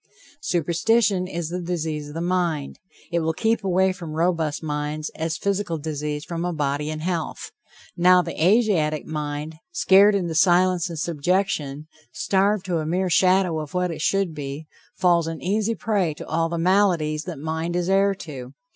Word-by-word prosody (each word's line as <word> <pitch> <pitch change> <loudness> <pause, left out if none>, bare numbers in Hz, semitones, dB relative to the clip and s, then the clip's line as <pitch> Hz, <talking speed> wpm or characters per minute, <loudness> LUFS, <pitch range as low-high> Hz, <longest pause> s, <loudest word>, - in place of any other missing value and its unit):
Superstition 185 - +1
is 170 -3 -4
the 180 +1 -3
disease 160 -4 -3
of 145 - -10
the 165 - -3
mind. 175 -5 -1 0.3
It 170 - +1
will 160 0 0
keep 225 +4 0
away 190 0 +2
from 170 -5 -8
robust 165 -2 0
minds, 150 0 -3
as 160 0 -3
physical 200 -4 -1
disease 150 0 -4
from 170 -1 -4
a 180 - -1
body 150 -1 -1
in 155 0 -4
health. 175 - -3 0.4
Now, 180 0 +5
the 170 - -5
Asiatic 180 -7 +2
mind, 150 0 -4
scared 195 +4 +5
into 175 -4 -1
silence 175 +1 +3
and 165 - -6
subjection, 155 -2 -1 0.3
starved 200 +4 +1
to 175 -3 -1
a 155 - -3
mere 180 +2 0
shadow 185 -1 +3
of 155 +2 -7
what 180 -1 0
it 160 - -6
should 195 -1 +1
be, 145 +1 -6 0.3
falls 175 -3 +3
an 165 -1 -4
easy 215 +4 0
prey 195 -9 0
to - - -8
all 165 +1 0
the 170 - -3
maladies 170 -4 +2
that 175 -4 -6
mind 160 +3 -3
is 175 0 0
heir 195 +1 +3
to. 135 -7 -9
170 Hz, 175 wpm, -23 LUFS, 155-185 Hz, 0.4 s, Now